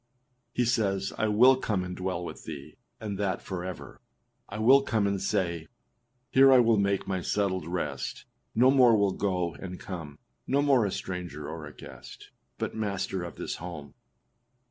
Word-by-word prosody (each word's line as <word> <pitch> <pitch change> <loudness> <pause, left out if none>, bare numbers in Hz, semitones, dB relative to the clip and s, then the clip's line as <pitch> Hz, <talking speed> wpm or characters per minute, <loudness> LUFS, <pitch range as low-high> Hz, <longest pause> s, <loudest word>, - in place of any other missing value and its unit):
He 125 - +1
says, 100 -5 0
âI 110 -1 +1
will 125 +5 +6
come 105 -7 -1
and 90 0 -5
dwell 90 -2 -3
with - - -9
thee, 70 -3 -8 0.2
and 105 -3 -5
that 95 -3 0
forever. 90 -2 -7 0.5
I 100 - -6
will 130 +6 +6
come 110 -6 0
and 100 -1 0
say, 85 -4 -1 0.6
Here 135 0 +7
I 130 - +8
will 115 -2 +4
make 100 -1 +1
my 95 -2 -1
settled 95 -3 -1
rest, 90 +1 -4 0.3
No 125 +4 +6
more 125 -4 +6
will 100 -2 +2
go 90 -4 -1
and 90 0 -8
come; 80 -6 -7 0.3
No 140 +1 +2
more 130 -7 +4
a - - -3
stranger 90 -6 -5
or - - -6
a - - -12
guest, - - -12 0.3
But - - -3
master 100 -3 -2
of 85 -1 -7
this - - -4
home. 80 -5 -8
100 Hz, 170 wpm, -28 LUFS, 90-110 Hz, 0.6 s, I